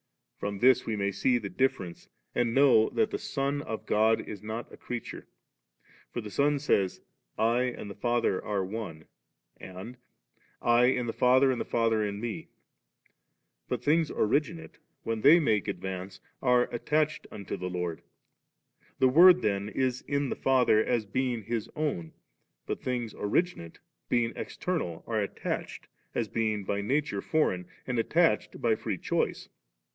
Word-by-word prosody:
From 100 0 -3
this 130 +4 +4
we 110 - -1
may 100 -1 0
see 125 +5 +2
the 105 -4 -5
difference, 95 -10 -2 0.2
and 120 -1 0
know 135 -5 +5
that 220 -1 0
the - - -2
Son 145 -8 -2
of 110 -5 -6
God 110 +1 +3
is 100 -3 -7
not 110 +2 -6
a - - -10
creature. 120 -1 -6 0.8
For 120 - -3
the 105 -1 -8
Son 145 +4 +2
•ay% 100 -10 0 0.4
•! 120 +2 +1
and - - -6
the - - -6
Father 120 -5 0
are 100 -3 -1
One/ 95 -6 -6 0.5
and, 95 +7 -9 0.6
*I 120 +1 +4
in 125 -1 +2
the 115 - -3
Father, 130 +2 +4
and 125 - -2
the - - -3
Father 115 -2 +1
m 100 -1 -2
Me; 115 -1 -5 0.6
' - - -44
but - - -2
things 160 +1 +3
originate 150 +8 -1 0.2
when 115 -1 -2
they 155 +7 +8
make 110 - +1
advance^ 95 -1 -5 0.2
are 125 -1 +4
at 120 - -6
tached 155 0 +1
unto 100 -2 -6
the 90 - -4
Lord, 90 -2 -3 1.0
The 130 -1 +4
Word 180 +6 +7
then 100 0 0
is 130 +1 -1
in 140 -1 0
the - - -2
Father 125 -5 +3
as 120 -3 0
being 120 +2 -1
His 115 0 -3
own; 135 - -2 0.5
but - - -4
things 120 -3 -3
originate, 105 - -1 0.3
bein^ 120 -1 +1
external, 150 - -3
are 110 -2 -1
attached, 100 - -4 0.3
as 115 - 0
being 110 -2 -1
by 100 +1 -2
nature 140 +8 0
foreign, 90 - 0 0.2
and 125 -2 -1
attached 165 +8 +2
by 115 -2 +2
free 110 -3 -3
choice. - - -1
115 Hz, 160 wpm, -29 LUFS, 105-130 Hz, 1.0 s, they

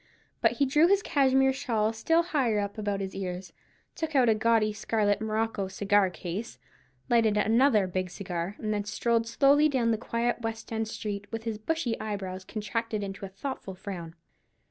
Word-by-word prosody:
But - - +4
he 280 - +2
drew 295 +5 +4
his 400 +2 +3
cashmere 265 -1 +3
shawl 225 -5 0
still 325 +10 +2
higher 270 -10 +1
up 200 +1 -3
about 205 -2 -1
his 190 -1 -4
ears, 185 -1 -5 0.4
took 320 -2 -4
out 250 -3 +5
a - - +6
gaudy 215 -1 +2
scarlet 210 -1 0
morocco 220 -2 -1
cigar 195 0 +2
case, 180 +5 -6 0.5
lighted 225 -4 +3
another 220 0 +4
big 185 0 -2
cigar, 180 0 -4
and 215 -1 -2
then 205 -1 -1
strolled 230 +2 0
slowly 285 +5 +4
down 245 -5 +1
the 220 - 0
quiet 235 +1 -1
West 225 0 -5
end 220 0 -1
street, 205 -2 -5
with 225 0 -4
his 225 -2 -3
bushy 260 -1 -1
eyebrows 195 -3 -4
contracted 215 +1 -3
into 195 0 -5
a - - -14
thoughtful 195 -1 -6
frown. 175 -4 -7
220 Hz, 175 wpm, -28 LUFS, 200-235 Hz, 0.5 s, a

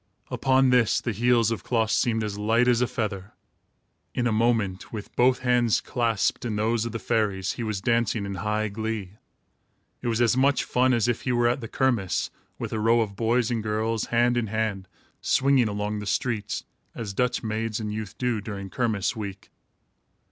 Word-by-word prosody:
Upon 130 -1 +3
this, 120 -3 +3
the 120 - -2
heels 115 +1 +2
of 115 - -3
Klaas 115 -3 0
seemed 110 +1 +1
as 105 -1 -3
light 115 +4 +2
as 120 -1 +3
a 125 - +3
feather. 100 -4 -4 0.8
In 120 - 0
a 120 - +2
moment, 110 -4 0
with 105 -2 -7
both 125 +1 +3
hands 125 -3 +3
clasped 115 -4 0
in 115 -3 -2
those 110 +2 +1
of 115 - -3
the 115 - -3
fairies, 105 -5 0
he - - -6
was 110 -4 -2
dancing 115 -2 +1
in 100 - -4
high 105 +3 -1
glee. 110 -2 -4 0.9
It - - -4
was 115 -1 0
as 120 0 +3
much 135 +1 +3
fun 130 +1 +2
as 115 -1 +1
if 120 -1 0
he 125 - -1
were 120 -1 +3
at 125 +3 0
the 115 - -5
kermiss, 115 -8 0 0.3
with - - -5
a 110 - -1
row 115 +2 +4
of 100 -3 -3
boys 115 +2 +1
and 115 -2 0
girls, 110 +1 -1
hand 120 +1 +2
in 115 -2 0
hand, 105 -3 -2 0.3
swinging 135 -3 +3
along 105 +1 -2
the 105 - -6
streets, 110 0 -2 0.3
as 105 -4 -5
Dutch 125 +4 0
maids 110 0 -2
and 105 -1 -4
youth 110 -3 -6
do, 125 -4 -1
during 100 -2 -6
kermiss 110 -6 0
week. 100 -3 -7
115 Hz, 190 wpm, -26 LUFS, 105-120 Hz, 0.9 s, row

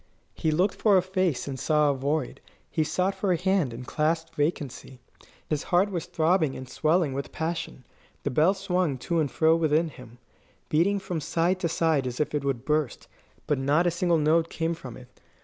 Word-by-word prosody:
He 160 - -1
looked 180 +6 +2
for 205 -3 +3
a - - +4
face, 185 -8 -1
and 135 -2 -5
saw 150 +1 +3
a - - 0
void. 140 +1 -2 0.3
He 160 - +1
sought 185 +5 0
for 195 0 -1
a 175 - +2
hand, 185 -6 +1
and 120 +2 -8
clasped 160 +3 -1
vacancy. 145 -4 -3 0.5
His 150 -2 -1
heart 185 +3 +3
was 170 -4 -3
throbbing 160 -3 +1
and 130 - -7
swelling 155 +1 +1
with 140 +1 -4
passion; 160 -5 -4 0.4
the 140 - -1
bell 160 +9 +3
swung 180 -7 0
to 170 +6 -1
and 150 -3 +1
fro 160 +3 +3
within 160 0 +2
him, 125 -4 -14 0.5
beating 180 +6 +2
from 185 -4 -4
side 170 +5 0
to 170 - -1
side 160 -5 +1
as 125 -1 -5
if 150 0 -1
it 145 -2 -1
would 135 -3 -2
burst; 150 -4 -1 0.4
but 145 -3 0
not 145 +6 +2
a 175 - +3
single 170 0 +1
note 160 +2 +2
came 165 0 -1
from 135 -8 -9
it. 125 - -13
160 Hz, 200 wpm, -26 LUFS, 140-175 Hz, 0.5 s, a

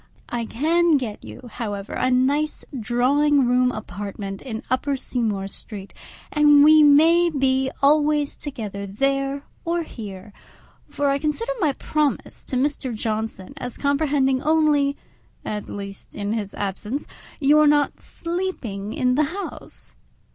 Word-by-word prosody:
I 235 -1 -2
can 320 +7 +2
get 235 -6 -5
you, 250 - -10
however, 205 -4 -5
a 255 - +1
nice 280 +4 +1
drawing 270 +5 +3
room 250 +1 +3
apartment 200 -2 -6
in 225 -4 -6
Upper 270 +2 0
Seymour 215 -7 -2
Street, 200 0 -8 0.4
and 295 -1 +6
we 310 +1 +8
may 325 +4 +6
be 265 -3 +1
always 295 0 +3
together 215 -9 -5
there 275 +6 -1 0.2
or 340 0 0
here; 205 -7 -9 0.6
for 285 - -1
I 275 - +1
consider 310 - -1
my 305 -7 +2
promise 300 +1 -2
to 260 - -2
Mr. 265 -2 -1
Johnson 215 -2 -3
as 250 -3 -6
comprehending 280 -2 +1
only 300 -2 +2 0.5
(at 210 -1 -4
least 200 -1 -7
in 205 +1 -2
his 205 -3 -4
absence) 205 +7 -3 0.3
your 300 +1 +5
not 290 -1 +2
sleeping 335 - -4
in 250 0 +1
the 300 +4 +3
house. 400 - -5
270 Hz, 135 wpm, -23 LUFS, 220-295 Hz, 0.6 s, we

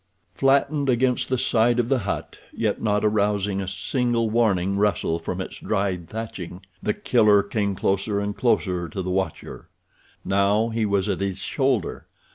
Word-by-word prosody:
Flattened 140 +1 +2
against 125 0 +1
the 130 - +1
side 120 0 +2
of 120 -1 +1
the 135 0 +2
hut, 100 -3 -4
yet - - -1
not 105 -1 +1
arousing 105 -2 +1
a 95 - -5
single 115 +4 0
warning 100 -5 +2
rustle 100 -5 +1
from - - -4
its - - -5
dried 95 -4 -2
thatching, 100 -5 -6 0.2
The 105 - -1
Killer 105 -4 +4
came 100 -1 -1
closer 100 +2 0
and 100 0 -3
closer 90 -8 0
to 95 +4 -4
the 90 - -3
watcher. 95 -3 -4 0.6
Now 100 +3 +2
he 110 -1 0
was 100 -2 +1
at - - -1
his 95 -1 -2
shoulder. 130 - -1
105 Hz, 160 wpm, -24 LUFS, 95-115 Hz, 0.6 s, Killer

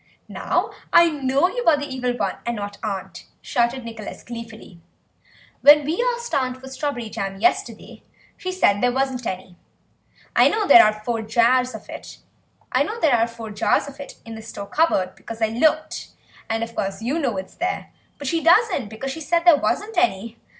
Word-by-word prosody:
"Now - - -1 0.2
I 340 -1 +6
know 275 +2 +1
that 370 - -8
you - - -1
are 315 -3 +6
the 290 - -4
Evil 250 -3 -3
One 195 -4 -1
and 235 0 -2
not 205 -1 -6
aunt," 200 -4 -5
shouted 240 +1 -1
Nicholas 225 -2 -8
gleefully; 225 -6 -10 0.8
"when 295 0 +7
we 330 +11 0
asked 475 0 -8
aunt 255 -1 0
for 265 - -11
strawberry 265 -3 -3
jam 195 -2 -5
yesterday 360 - -1 0.3
she 370 - -5
said 205 - +2
there 245 0 +3
wasn't 260 -2 -1
any. 185 -1 -6 0.8
I - - +6
know 430 -1 0
there 355 - +9
are 215 - +4
four 235 -2 -1
jars 240 +2 +2
of 215 - -11
it - - -12 0.6
in 235 - -1
the 220 - -8
store 215 -2 -8
cupboard, 200 - +1
because 230 0 -9
I 220 -1 +1
looked, 310 +7 0 0.4
and 225 0 -1
of 230 0 -6
course 195 +2 -3
you 275 +8 -1
know 250 -10 -1
it's 190 0 -6
there, 365 +2 -3 0.3
but 285 - -8
she 330 +4 0
doesn't, 350 - +3
because 245 +5 -5
she 320 - -7
said 340 +3 0
there 345 -3 +8
wasn't 415 +5 -1
any. 230 - 0
250 Hz, 170 wpm, -22 LUFS, 220-310 Hz, 0.8 s, there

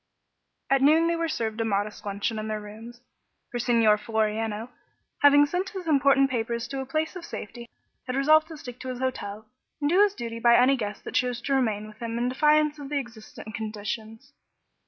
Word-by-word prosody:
At 275 -1 +4
noon 310 +4 +5
they 335 0 +1
were 335 0 -1
served 225 -5 -2
a - - +2
modest 210 0 -2
luncheon 205 +2 -2
in 215 - -4
their 215 -1 -2
rooms, 225 +3 -11 0.5
for 240 - -3
Signor 230 -3 +3
Floriano, 220 0 -2 0.5
having 290 0 +7
sent 360 +6 -2
his 375 -4 -7
important 275 -2 +4
papers 235 -1 -2
to 275 -1 -3
a 265 - -7
place 310 +5 -2
of 365 - -7
safety, 235 -5 -8 0.4
had 255 - -2
resolved 310 +3 +4
to 320 -2 -9
stick 245 -3 -10
to 260 - -8
his 255 - -4
hotel 220 -5 -4 0.3
and 290 0 0
do 370 +3 +5
his 410 -1 +3
duty 230 -1 -5
by 235 0 +5
any 255 +2 +5
guests 210 -5 -5
that - - -7
chose 250 -1 0
to 275 - -1
remain 220 -6 0
with 215 0 -14
him 230 0 -3
in 245 +1 0
defiance 300 +2 +3
of 280 -1 -7
the 295 - -1
existent 225 -4 -8
conditions. 220 +4 -6
240 Hz, 200 wpm, -26 LUFS, 220-285 Hz, 0.5 s, having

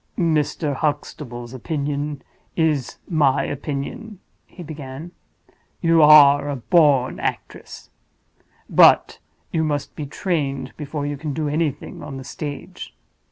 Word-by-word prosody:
"Mr. 155 -2 0
Huxtable's 135 -5 -4
opinion 145 +1 -3 0.3
is 155 -6 0
my 145 -5 +2
opinion," 175 - -5 0.3
he 180 - -11
began. 150 +1 -8 0.7
"You 165 -1 +4
are 145 -1 +7
a 145 - -2
born 140 -1 +3
actress. - - -6 0.8
But - - +5 0.3
you 160 - 0
must 145 -3 -2
be 150 - -5
trained 140 -5 -2
before 150 -1 -5
you 145 0 -3
can 150 0 -4
do 150 +2 -2
anything 150 -1 -2
on 145 -2 -7
the 135 - -8
stage. 145 0 -7
145 Hz, 115 wpm, -22 LUFS, 140-160 Hz, 0.8 s, are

